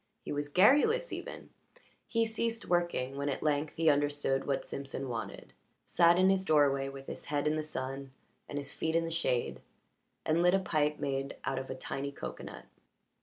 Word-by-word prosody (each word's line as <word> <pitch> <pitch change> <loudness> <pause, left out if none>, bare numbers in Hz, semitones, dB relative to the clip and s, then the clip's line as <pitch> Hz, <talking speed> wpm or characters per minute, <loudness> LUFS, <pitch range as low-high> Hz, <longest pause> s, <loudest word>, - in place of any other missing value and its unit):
He - - -4
was 145 0 -2
garrulous 295 - +4
even; - - -7 0.6
he 230 -1 +2
ceased 225 0 -2
working 170 -7 0
when 140 +1 -1
at 135 - -3
length 150 0 0
he 165 0 +1
understood 145 -2 +2
what 140 - 0
Simpson 135 -1 -4
wanted, 115 -2 -6 0.3
sat 170 0 +5
in 185 +1 +5
his 190 -1 +1
doorway 140 -4 +3
with 135 0 -9
his - - -8
head 145 0 -1
in 150 0 +2
the 155 - 0
sun 135 -2 -5 0.4
and 145 - -4
his 140 -1 -4
feet 160 0 -1
in 165 0 +2
the 165 - -4
shade, 160 -7 0 0.6
and 160 +2 +2
lit 180 +2 +5
a - - +3
pipe 150 -5 0
made 135 0 -2
out 135 -1 -1
of 130 - -7
a 130 - -4
tiny 135 +2 -4
cocoanut. - - -8
145 Hz, 185 wpm, -32 LUFS, 135-175 Hz, 0.6 s, sat